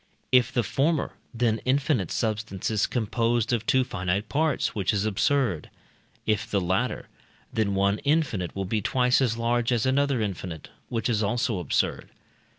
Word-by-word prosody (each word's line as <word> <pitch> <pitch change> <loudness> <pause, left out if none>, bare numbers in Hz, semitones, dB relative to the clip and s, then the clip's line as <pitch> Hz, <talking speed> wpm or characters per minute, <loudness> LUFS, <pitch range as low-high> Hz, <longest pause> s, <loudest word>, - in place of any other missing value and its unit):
If 125 0 +4
the 120 -2 +1
former, 145 +5 0 0.2
then 115 -2 0
infinite 130 - +1
substance 110 -3 -2
is 105 -2 +1
composed 115 0 0
of 115 -2 -1
two 130 0 +4
finite 100 -2 -2
parts, 155 +1 +1
which 100 0 0
is 105 0 0
absurd. 110 - +1 0.6
If 105 -1 0
the 100 - +1
latter, 95 +7 -1 0.5
then 100 -3 0
one 100 +2 +2
infinite 140 - 0
will 95 0 -2
be 105 +3 -1
twice 125 +4 +2
as 115 -3 +1
large 120 +1 +1
as 120 -1 +1
another 140 0 +2
infinite, 95 -6 -4 0.2
which 115 -1 -1
is 110 -4 +1
also 110 0 0
absurd. 85 - -1
115 Hz, 155 wpm, -26 LUFS, 100-125 Hz, 0.6 s, If